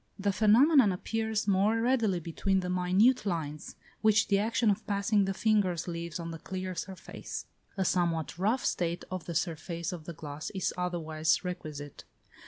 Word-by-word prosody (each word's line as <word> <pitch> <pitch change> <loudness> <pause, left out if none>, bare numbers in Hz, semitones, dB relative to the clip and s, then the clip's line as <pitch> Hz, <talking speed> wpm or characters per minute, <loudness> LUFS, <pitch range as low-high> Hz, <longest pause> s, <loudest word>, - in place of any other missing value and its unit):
The 200 0 0
phenomenon 230 - +5
appears 220 +3 -2
most 205 +3 +3
readily 230 -6 +2
between 190 +4 0
the 180 0 -3
minute 185 +8 +3
lines, 160 -6 -4 0.3
which 215 -1 +4
the 200 -1 +4
action 225 +1 +2
of 205 +2 -4
passing 200 0 +2
the 195 - -1
fingers 200 -6 +1
leaves 170 -1 -4
on 170 0 -5
the 165 - -7
clear 185 +2 -5
surface; 185 +2 -6 0.3
a 190 - +1
somewhat 170 -3 0
rough 220 +7 +1
state 170 0 -1
of 185 -3 -4
the 170 - -5
surface 170 +1 -2
of 170 -4 -7
the 170 - -6
glass 150 -1 -6
is 190 - -1
otherwise 165 -2 0
requisite. 150 -5 -6
185 Hz, 165 wpm, -30 LUFS, 170-210 Hz, 0.3 s, phenomenon